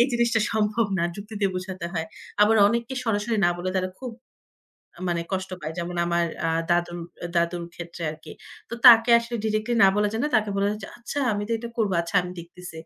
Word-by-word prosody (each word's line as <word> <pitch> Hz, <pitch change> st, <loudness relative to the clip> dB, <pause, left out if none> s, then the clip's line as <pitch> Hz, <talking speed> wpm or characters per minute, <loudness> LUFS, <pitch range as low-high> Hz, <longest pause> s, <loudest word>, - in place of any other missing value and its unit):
এই 240 Hz, -, +6 dB
জিনিসটা 235 Hz, -1 st, +2 dB
সম্ভব 215 Hz, +1 st, +1 dB
না। -, -, +1 dB
যুক্তি 210 Hz, +2 st, -9 dB
দিয়ে 195 Hz, -, +2 dB
বোঝাতে 185 Hz, -1 st, -5 dB
হয়। 160 Hz, -2 st, -2 dB, 0.4 s
আবার 220 Hz, +1 st, +5 dB
অনেককে 235 Hz, +4 st, -2 dB
সরাসরি 225 Hz, +1 st, 0 dB
না -, -, +3 dB
বলে, 185 Hz, +1 st, -2 dB
তারা 185 Hz, 0 st, 0 dB
খুব 255 Hz, -2 st, -6 dB, 1.0 s
মানে 170 Hz, -1 st, 0 dB
কষ্ট 190 Hz, 0 st, -2 dB
পায়। 155 Hz, +1 st, -5 dB
যেমন 175 Hz, +1 st, -4 dB
আমার 170 Hz, 0 st, +1 dB, 0.2 s
আ -, -, +2 dB, 0.2 s
দাদুর 175 Hz, 0 st, +1 dB, 0.4 s
দাদুর 170 Hz, 0 st, 0 dB
ক্ষেত্রে 170 Hz, 0 st, -9 dB
আরকি। 155 Hz, +1 st, -11 dB, 0.4 s
তো -, -, -6 dB
তাকে 230 Hz, -1 st, +9 dB
আসলে 235 Hz, +1 st, -5 dB
ডিরেক্টলি 215 Hz, +2 st, 0 dB
না -, -, +8 dB
বলা 210 Hz, 0 st, +2 dB
যায় 220 Hz, +1 st, -2 dB
না, -, -, +2 dB
তাকে 215 Hz, -1 st, +2 dB
বলা 200 Hz, 0 st, +1 dB
যায় 210 Hz, -, -5 dB
যে, -, -, -6 dB
"আচ্ছা, 240 Hz, +4 st, -5 dB
আমি 205 Hz, 0 st, -2 dB
তো -, -, -5 dB
এটা 235 Hz, +1 st, -7 dB
করব। 215 Hz, -4 st, +1 dB
আচ্ছা, 170 Hz, +3 st, -6 dB
আমি 180 Hz, -, -7 dB
দেখতেছি।" 175 Hz, 0 st, -10 dB
205 Hz, 210 wpm, -25 LUFS, 175-225 Hz, 1.0 s, তাকে